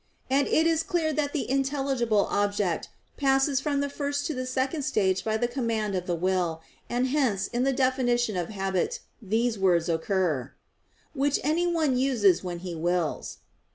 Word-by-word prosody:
And 275 Hz, +1 st, +3 dB
it 320 Hz, -, +3 dB
is 325 Hz, -1 st, +3 dB
clear 325 Hz, -2 st, 0 dB
that 290 Hz, -1 st, 0 dB
the 295 Hz, -, -2 dB
intelligible 270 Hz, -5 st, +1 dB
object 205 Hz, -4 st, 0 dB, 0.3 s
passes 270 Hz, 0 st, +2 dB
from 285 Hz, -1 st, 0 dB
the 285 Hz, -, 0 dB
first 285 Hz, 0 st, -3 dB
to 315 Hz, -, -1 dB
the 255 Hz, -1 st, -4 dB
second 265 Hz, +4 st, -1 dB
stage 190 Hz, -7 st, +1 dB
by 220 Hz, 0 st, 0 dB
the 240 Hz, -, 0 dB
command 230 Hz, -5 st, -2 dB
of 180 Hz, -1 st, -2 dB
the 175 Hz, -, 0 dB
will, 175 Hz, -2 st, -1 dB, 0.3 s
and 250 Hz, +2 st, 0 dB
hence 255 Hz, -9 st, +1 dB
in 245 Hz, +2 st, -1 dB
the 275 Hz, -, +3 dB
definition 250 Hz, -4 st, +1 dB
of 175 Hz, -2 st, -2 dB
habit 195 Hz, -, -2 dB, 0.2 s
these 225 Hz, +1 st, 0 dB
words 175 Hz, -3 st, +2 dB
occur, 160 Hz, -, 0 dB, 0.6 s
"which 285 Hz, 0 st, +1 dB
anyone 320 Hz, -3 st, +1 dB
uses 230 Hz, -10 st, +3 dB
when 175 Hz, -1 st, -4 dB
he 180 Hz, -, -4 dB
wills." 170 Hz, 0 st, -2 dB
240 Hz, 165 wpm, -27 LUFS, 190-280 Hz, 0.6 s, And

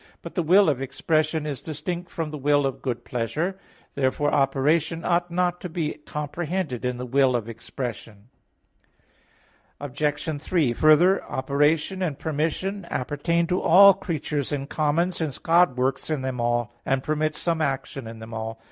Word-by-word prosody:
11:26). -, -, -25 dB, 0.2 s
But -, -, -8 dB
the 180 Hz, -, 0 dB
will 185 Hz, +4 st, +5 dB
of 140 Hz, -4 st, +1 dB
expression 155 Hz, +3 st, 0 dB
is 145 Hz, -3 st, -4 dB
distinct 170 Hz, +3 st, -5 dB
from 160 Hz, -2 st, -4 dB
the 150 Hz, -, -5 dB
will 145 Hz, +1 st, +3 dB
of 135 Hz, -, -3 dB
good 120 Hz, -2 st, -3 dB
pleasure. 155 Hz, -, -2 dB, 0.3 s
Therefore 140 Hz, +2 st, 0 dB
operation 150 Hz, +4 st, +1 dB
ought 175 Hz, 0 st, +1 dB
not 180 Hz, 0 st, 0 dB
to 180 Hz, -, -5 dB
be 160 Hz, -2 st, -2 dB
comprehended 150 Hz, -2 st, -3 dB
in 125 Hz, -1 st, -1 dB
the 125 Hz, -, -5 dB
will 130 Hz, 0 st, +3 dB
of 115 Hz, -2 st, -2 dB
expression. 115 Hz, -2 st, -7 dB, 1.5 s
Obj. 145 Hz, +1 st, -2 dB
3: 155 Hz, -8 st, +1 dB
Further, 155 Hz, +8 st, +5 dB
operation 150 Hz, +7 st, 0 dB
and 160 Hz, -7 st, -1 dB
permission 170 Hz, +6 st, -2 dB
appertain 170 Hz, +6 st, 0 dB
to 180 Hz, +2 st, 0 dB
all 200 Hz, +4 st, +8 dB
creatures 155 Hz, -6 st, -3 dB
in 140 Hz, -2 st, -2 dB
common, 155 Hz, +4 st, +1 dB
since 160 Hz, -6 st, -3 dB
God 170 Hz, -5 st, +3 dB
works 130 Hz, +3 st, -1 dB
in 150 Hz, -4 st, -1 dB
them 130 Hz, -2 st, -3 dB
all, 120 Hz, 0 st, 0 dB
and 135 Hz, 0 st, 0 dB
permits 155 Hz, 0 st, -1 dB
some 165 Hz, -1 st, -1 dB
action 135 Hz, -3 st, -2 dB
in 115 Hz, 0 st, -8 dB
them 110 Hz, +1 st, -10 dB
all. 110 Hz, 0 st, -5 dB
150 Hz, 165 wpm, -25 LUFS, 130-170 Hz, 1.5 s, all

